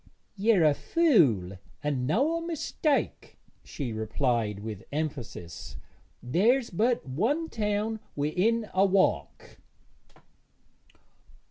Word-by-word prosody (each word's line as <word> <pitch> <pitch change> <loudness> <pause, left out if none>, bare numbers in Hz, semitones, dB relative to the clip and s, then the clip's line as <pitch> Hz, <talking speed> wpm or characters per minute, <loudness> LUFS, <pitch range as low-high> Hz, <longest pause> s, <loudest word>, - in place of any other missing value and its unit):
'Yer 205 -3 +3
a 150 -2 +5
fool 140 - +2 0.2
and 135 -4 -1
noä 285 - +1
mistake,' 320 -2 -2 0.3
she 130 -6 -5
replied 110 -1 -1
with 105 -3 -6
emphasis. 135 - -5 0.5
'There's 230 - +2
but 230 - 0
one 235 - 0
town 215 0 -1 0.2
wi'in 195 +10 +1
a 190 - +4
walk.' 195 -1 0
180 Hz, 90 wpm, -28 LUFS, -, 0.5 s, a